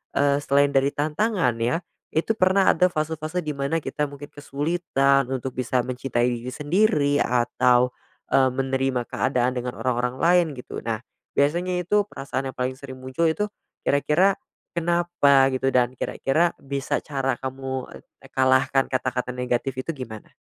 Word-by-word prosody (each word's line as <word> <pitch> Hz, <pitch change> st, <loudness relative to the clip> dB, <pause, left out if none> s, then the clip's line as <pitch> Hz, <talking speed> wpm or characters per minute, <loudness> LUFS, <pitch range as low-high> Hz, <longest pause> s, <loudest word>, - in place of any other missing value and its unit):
eee, 140 Hz, 0 st, +3 dB
selain 140 Hz, 0 st, +3 dB
dari 135 Hz, 0 st, +3 dB
tantangan 155 Hz, -, +1 dB
ya, 125 Hz, +9 st, 0 dB, 0.3 s
itu 160 Hz, +7 st, +1 dB
pernah 190 Hz, 0 st, +4 dB
ada 180 Hz, +2 st, +3 dB
fase-fase 160 Hz, +1 st, -3 dB
di 155 Hz, -, -2 dB
mana 140 Hz, +4 st, 0 dB
kita 150 Hz, -1 st, -2 dB
mungkin 145 Hz, 0 st, -10 dB
kesulitan 140 Hz, -2 st, +1 dB
untuk 130 Hz, 0 st, -3 dB
bisa 125 Hz, 0 st, 0 dB
mencintai 125 Hz, -1 st, -1 dB
diri 120 Hz, 0 st, -5 dB
sendiri, 150 Hz, -2 st, +2 dB
atau, 125 Hz, +1 st, +2 dB, 0.4 s
eee, 135 Hz, -1 st, +5 dB
menerima 135 Hz, -1 st, 0 dB
keadaan 125 Hz, -1 st, +1 dB
dengan 125 Hz, 0 st, -3 dB
orang-orang 125 Hz, 0 st, 0 dB
lain 175 Hz, +2 st, +5 dB
gitu. -, -, -7 dB
Nah, 110 Hz, -2 st, -2 dB, 0.3 s
biasanya 175 Hz, +6 st, +1 dB
itu 205 Hz, +4 st, +2 dB
perasaan 135 Hz, -6 st, -4 dB
yang -, -, -26 dB
paling 130 Hz, +1 st, -1 dB
sering 135 Hz, -2 st, -8 dB
muncul 130 Hz, +6 st, -1 dB
itu 210 Hz, +6 st, -1 dB, 0.4 s
kira-kira 155 Hz, +7 st, +3 dB, 0.4 s
kenapa 170 Hz, -5 st, +3 dB
gitu 135 Hz, +1 st, 0 dB
dan 125 Hz, 0 st, +3 dB
kira-kira 160 Hz, +9 st, +1 dB
bisa 140 Hz, 0 st, -2 dB
cara 135 Hz, -2 st, -1 dB
kamu, 130 Hz, 0 st, -4 dB
eee, -, -, -18 dB, 0.2 s
e -, -, -11 dB
kalahkan 130 Hz, +1 st, +3 dB
kata-kata 125 Hz, -1 st, -1 dB
negatif 125 Hz, +1 st, -1 dB
itu 165 Hz, -, -2 dB
gimana? 110 Hz, -5 st, -8 dB
135 Hz, 150 wpm, -24 LUFS, 130-160 Hz, 0.4 s, eee